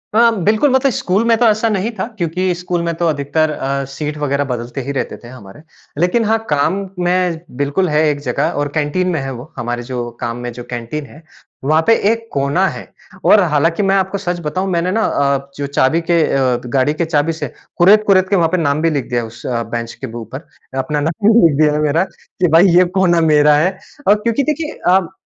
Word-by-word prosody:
हाँ, 230 +1 +5
बिल्कुल 215 - +3
मतलब 265 +1 +3
स्कूल 200 0 0
में 230 -1 +3
तो 240 - +2
ऐसा 220 +2 +1
नहीं 210 +2 -1
था, - - 0
क्योंकि 180 +1 -1
स्कूल 175 0 -3
में 170 - -1
तो 170 0 0
अधिकतर 155 +1 0
अ, 140 -1 -2
सीट 150 +2 -5
वगैरह 145 -1 0
बदलते 125 +1 -4
ही 135 +2 -5
रहते 135 - -3
थे 120 - -14
हमारे। 120 0 -13 0.4
लेकिन 180 +7 +2
हाँ 225 +1 +2
काम 145 +4 +2 0.3
में 180 -2 +1 0.2
बिल्कुल 145 +6 0
है 150 0 +2
एक 145 -1 -2
जगह 135 +2 -1
और 145 - -2
कैंटीन 155 +5 0
में 160 - -1
है 135 - -4
वो। 125 +7 -10
हमारे 120 0 -3
जो 120 -1 -4
काम 115 0 -3
में 120 0 -5
जो 120 +1 -8
कैंटीन 120 +5 -5
है, 150 +3 -15 0.4
वहाँ 155 +4 +3
पे 225 - +6 0.2
एक 230 0 -4
कोना 140 +7 +1
है - - -6 0.4
और 210 - +6
हालाँकि 165 +6 +1
मैं 195 0 +2
आपको 190 +1 0
सच 180 -3 -3
बताऊँ 185 +6 -2
मैंने 170 +1 0
ना 220 +3 0
अ, 140 -1 0
जो 140 - -3
चाबी 140 +3 +1
के 170 -1 +4
अ, 130 -2 +1
गाड़ी 130 +3 +1
के 165 +2 -1
चाबी 160 0 0
से 160 - -6 0.2
कुरेद-कुरेद 195 0 +4
के 200 - +2
वहाँ 165 -3 +2
पे 185 - +2
नाम 150 -2 0
भी 165 - +2
लिख 145 -5 -2
दिया 120 -1 0
है 115 - -6
उस 120 +2 -13
अ, 120 -2 -1
बेंच 115 +1 -5
के - - -8
ऊपर। 130 +7 -9 0.3
अपना 140 +3 -1
नाम 165 +7 -1 0.2
लिख 145 - -1
दिया 150 -1 +4
है 150 - 0
मेरा 150 +3 +2
कि 180 - -3
भाई 165 +4 +6
ये 180 - +7 0.2
कोना 175 -3 +3
मेरा 150 0 +5
है। 185 +5 +1 0.3
और 205 - +6
क्योंकि 235 +4 +1
देखिए 305 +2 -3 0.2
अब 190 -2 0
155 Hz, 225 wpm, -17 LUFS, 140-185 Hz, 0.4 s, ये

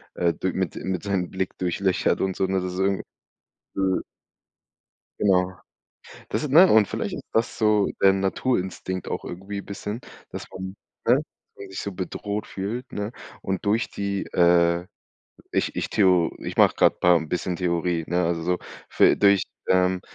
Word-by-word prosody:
äh, 85 -1 +2
d 95 +3 -2
mit 95 -2 -2
mit 95 -2 -3
seinem 95 -3 -1
Blick 95 -1 -3
durchlöchert 90 +1 0
und 95 -1 0
so, 95 - +1
ne? 95 0 0
Das 90 0 -4
ist 90 - -5
irgend 95 0 +1 0.7
öh 95 -1 +1 1.2
Genau. 95 -2 +3 0.8
Das - - -1
ist 150 - -3
ne? 175 +6 +8
Und 110 -2 +5
vielleicht - - -3
ist - - -7
das 115 +1 0
so 105 -2 +3
der 95 0 +7
Naturinstinkt 95 -2 -1
auch - - -4
irgendwie 95 +3 -6
bisschen, 105 +3 -6 0.3
dass - - -6
man 95 +1 -7 0.3
ne, - - +6
dass - - -2 0.3
man 100 -1 -10
sich 95 - -5
so 100 - -4
bedroht 100 +3 -4
fühlt, 115 +6 -5
ne? 105 +3 -3 0.3
Und 95 -1 -3
durch 110 +4 +1
die, 100 -1 -2
äh 85 0 +4 0.7
ich - - 0
ich - - -2
theo 90 -4 +3
ich - - -6
mache - - +6
grade - - +4
paar 90 -1 +6
'n 80 -1 -2
bisschen 90 +1 -2
Theorie, 85 -1 0
ne? 90 +1 +1
Also, 85 -1 -1
so, 90 +1 0 0.3
fü - - +5
durch 100 -2 +5 0.3
ähm, 90 0 +3
95 Hz, 175 wpm, -24 LUFS, 90-100 Hz, 1.2 s, ne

